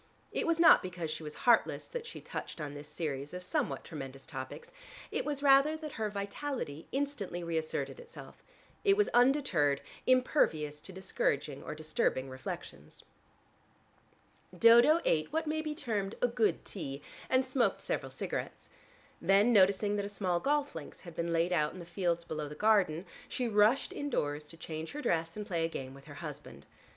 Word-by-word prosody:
It - - -1
was 335 0 +2
not 335 - +8
because 175 -3 -4
she 155 - -4
was 150 -1 -7
heartless 240 -2 +4
that 475 -1 -6
she 465 - -8
touched - - -6
on 145 -2 -4
this 145 +1 -9
series 150 -1 -4
of 180 - -6
somewhat 290 - -1
tremendous 135 -4 -8
topics: 130 -3 -7 0.4
it - - -1
was 290 -1 -2
rather 280 +3 +6
that 310 -1 -7
her 220 -3 -2
vitality 200 - -4
instantly 260 -11 -2
reasserted 160 - -2
itself: 480 0 -12 0.4
it 400 -1 +4
was 415 - +3
undeterred, 240 - +3 0.3
impervious 160 - +2
to - - -8
discouraging 150 -7 -1
or 150 - -6
disturbing 155 -4 0
reflections. 130 0 -8 1.5
Dodo 235 - +7
ate 155 -1 +2
what 320 +1 0
may 315 +1 -1
be 305 -1 -4
termed 210 -8 -2
a 245 - +3
good 230 -2 +1
tea, 145 -6 -6 0.3
and 255 0 +3
smoked 255 -6 +1
several 135 - -3
cigarettes. 130 - -5 0.5
Then 200 +7 +5
noticing 200 +1 +4
that 200 - -1
a - - -4
small 185 -4 0
golf 290 +5 +1
links 155 -3 -9
had 170 -3 -10
been 170 0 -2
laid 170 +2 +2
out 150 -3 +1
in 185 - -9
the 170 - -8
fields 175 -1 -1
below 155 -2 -4
the 150 - -8
garden, 195 -4 +3 0.2
she 250 - -1
rushed 215 +4 +3
indoors 150 - -2
to 165 +2 -14
change 160 -1 -6
her 295 - -4
dress, 165 +2 0
and 210 - -4
play 170 -5 -1
a - - +2
game 130 -4 -6
with 135 0 -14
her - - -10
husband. - - -8
185 Hz, 175 wpm, -32 LUFS, 155-255 Hz, 1.5 s, not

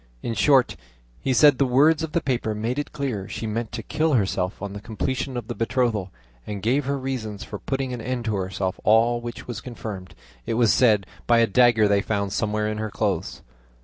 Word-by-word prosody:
In 115 - -2
short, 135 +1 +3 0.4
he 135 - -1
said, 145 +1 +6
the 140 - +4
words 150 +6 +4
of 160 -2 -4
the 170 - +1
paper 120 -5 -1
made 115 +6 -2
it 145 - -4
clear 130 -10 -3
she - - -5
meant 110 +1 -3
to 115 -1 -4
kill 160 +5 0
herself 95 -4 0
on 100 -1 -5
the 100 - -7
completion 125 +4 -3
of 115 -3 -5
the - - -3
betrothal, 115 -4 0 0.4
and 100 -2 -5
gave 130 +5 +1
her 140 +1 -1
reasons 125 -6 -4
for 105 - -7
putting 135 -1 -3
an 120 - -5
end 125 0 -3
to 110 - 0
herself 95 0 -2
all 115 +2 +4
which 120 -1 -7
was 120 -3 -5
confirmed, 105 -7 -7 0.3
it 115 - 0
was 115 -2 +4
said, 105 -6 +4 0.2
by 120 - +5
a 115 - +5
dagger 115 0 +4
they 100 -1 +3
found 100 -2 -2
somewhere 105 0 0
in 105 0 -3
her 110 0 -2
clothes. 95 - -2
115 Hz, 215 wpm, -24 LUFS, 105-130 Hz, 0.4 s, said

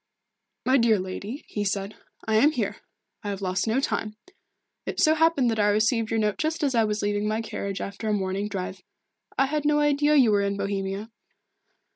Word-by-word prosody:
"My 260 +2 +4
dear 230 -2 +4
lady," 200 +8 -6
he 205 - -3
said, 200 0 -2 0.3
"I 220 0 +3
am 295 +7 +5
here. - - -2 0.5
I 205 - -3
have 200 -1 -3
lost 185 +3 -1
no 225 +4 +2
time. 215 -5 -2 0.7
It - - -3
so 310 - +5
happened 315 -6 +3
that 220 - -2
I 205 0 +4
received 220 +2 +2
your 225 - 0
note 210 -1 0
just 315 +1 -1
as 275 -2 +1
I 230 -2 +3
was 210 0 -2
leaving 205 0 0
my 215 +1 0
carriage 200 -3 -4
after 200 +2 -4
a - - +2
morning 195 0 -1
drive. 190 -2 -5 0.6
I 270 - +4
had 295 +2 -1
no 300 0 +3
idea 295 0 +3
that 300 - +6
you 240 -5 +5
were 205 -1 +3
in 200 0 -1
Bohemia." 195 +2 -3
215 Hz, 205 wpm, -26 LUFS, 200-265 Hz, 0.7 s, that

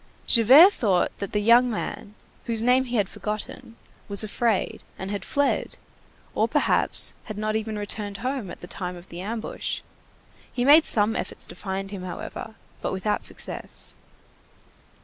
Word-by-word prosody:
Javert 270 - +8
thought 190 -6 +1
that 200 - -4
the 210 - +1
young 235 +4 +5
man, 210 -2 -5 0.3
whose 225 -1 -1
name 250 +2 +4
he 245 -1 -4
had 205 -4 +2
forgotten, 215 +3 -6 0.3
was 200 +1 +3
afraid, 215 0 -1 0.2
and 190 +1 -5
had 205 - -3
fled, 285 0 0 0.6
or - - +2
perhaps, - - +2
had 215 -2 -7
not 215 0 -1
even 220 -1 -2
returned 205 0 -4
home 260 -7 -2
at - - -10
the - - -7
time 180 0 -5
of 175 +1 -13
the 170 +1 -7
ambush; 220 +3 -4 0.7
he 245 - -1
made 300 +3 +7
some 215 0 +3
efforts - - -3
to - - -9
find 195 0 -5
him, 200 -3 -6
however, 185 +4 -7 0.3
but - - -2
without 190 +2 -1
success. - - -3
215 Hz, 160 wpm, -25 LUFS, 200-235 Hz, 0.7 s, Javert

